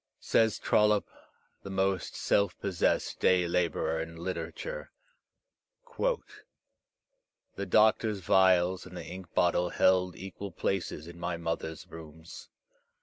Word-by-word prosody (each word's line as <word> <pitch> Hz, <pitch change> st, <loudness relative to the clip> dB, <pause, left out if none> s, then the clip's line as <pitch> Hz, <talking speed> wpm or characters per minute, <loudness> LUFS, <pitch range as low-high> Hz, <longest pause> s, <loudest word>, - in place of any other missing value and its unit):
Says 110 Hz, -2 st, +2 dB
Trollope, 105 Hz, -1 st, +3 dB, 0.5 s
the 100 Hz, -, -9 dB
most 95 Hz, -1 st, -1 dB
self 100 Hz, -3 st, +1 dB
possessed 95 Hz, -4 st, 0 dB
day 90 Hz, -1 st, +3 dB
labourer 85 Hz, -2 st, 0 dB
in 80 Hz, +1 st, -7 dB
literature, 95 Hz, -, -5 dB, 1.1 s
"The -, -, -7 dB
doctor's 110 Hz, 0 st, +3 dB
vials 95 Hz, 0 st, +3 dB
and 90 Hz, 0 st, -10 dB
the -, -, -7 dB
ink 90 Hz, -2 st, -9 dB
bottle 90 Hz, 0 st, +2 dB
held 90 Hz, -1 st, +2 dB
equal 95 Hz, +1 st, -7 dB
places 85 Hz, -2 st, -2 dB
in 85 Hz, +1 st, -11 dB
my 85 Hz, 0 st, -2 dB
mother's 80 Hz, -1 st, -4 dB
rooms. 80 Hz, 0 st, -11 dB
90 Hz, 110 wpm, -30 LUFS, 85-100 Hz, 1.1 s, Trollope